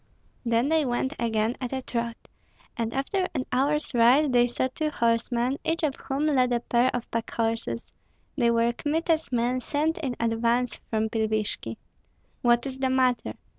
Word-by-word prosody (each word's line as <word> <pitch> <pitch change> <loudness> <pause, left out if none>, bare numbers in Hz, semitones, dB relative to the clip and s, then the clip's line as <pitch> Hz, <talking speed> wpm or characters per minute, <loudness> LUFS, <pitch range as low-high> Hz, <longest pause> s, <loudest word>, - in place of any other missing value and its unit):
Then 235 +3 +2
they 320 -1 +3
went 260 +1 -1
again 225 0 0
at 250 - -3
a 265 -1 -3
trot, 235 -1 -4 0.5
and 230 -1 -2
after 365 +9 -1
an 260 - -1
hour's 290 +3 +1
ride 250 +4 +5
they 245 0 +5
saw 245 +2 -1
two 310 -1 -1
horsemen, 235 +1 0
each 325 +1 -1
of 295 -3 +2
whom 275 +2 -2
led 255 -5 +3
a 240 - +2
pair 240 +1 +2
of 245 - -3
packhorses. 230 0 -2 0.5
They 240 -4 +3
were 235 0 +2
Kmita's 315 +1 0
men 245 +1 +1
sent 305 +6 -1
in 265 -6 -2
advance 230 +1 +1
from 220 -1 +1
Pilvishki. 215 -1 -1 0.6
"What 240 0 +3
is 265 -1 -5
the 265 -1 +1
matter?" 255 -2 +1
245 Hz, 165 wpm, -26 LUFS, 235-275 Hz, 0.6 s, ride